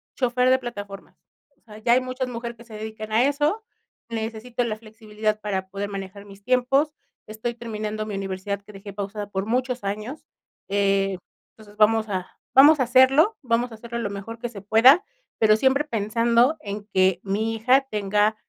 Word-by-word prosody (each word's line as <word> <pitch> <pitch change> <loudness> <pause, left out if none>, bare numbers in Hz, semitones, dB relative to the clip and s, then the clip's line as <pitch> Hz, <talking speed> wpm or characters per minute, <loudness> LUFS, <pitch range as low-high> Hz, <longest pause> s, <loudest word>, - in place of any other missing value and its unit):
chofer 250 0 +2
de 260 - +5
plataformas. 205 -5 -8 0.4
O - - -40
sea, 215 -2 -13
ya 235 +2 +2
hay 255 - +4
muchas 255 0 -3
mujeres 235 -1 -6
que 235 - -13
se 235 -2 -15
dedican 215 0 -7
a 230 +4 +4
eso, 295 +10 0 0.5
necesito 230 +2 -3
la 220 -2 -3
flexibilidad 215 -1 -4
para 190 -2 -3
poder 200 +1 -4
manejar 195 0 -7
mis 200 0 -15
tiempos, 255 +5 +2 0.3
estoy 220 +3 -4
terminando 215 -2 -5
mi 210 - -4
universidad, 195 +1 -3
que 210 +1 -14
dejé 195 +1 -10
pausada 205 +1 -5
por 195 0 -3
muchos 250 0 -1
años, 215 +9 -5 0.4
eh, 195 -1 +1 0.3
entonces 210 -1 -17
vamos 220 0 +3
a 185 -2 -3 0.3
vamos 290 +3 +8
a 260 - +4
hacerlo, 265 - +5
vamos 240 0 0
a - - -8
hacerlo 235 +1 -6
lo 205 -3 -2
mejor 200 +3 -7
que 240 0 -4
se 200 -5 -10
pueda, 245 - +6 0.3
pero 215 -1 +5
siempre 265 +5 +2
pensando 235 +4 +2
en 205 0 -6
que 185 -1 +3
mi 215 +3 -1
hija 250 +5 +4
tenga, 210 +1 +1
220 Hz, 180 wpm, -24 LUFS, 205-245 Hz, 0.5 s, vamos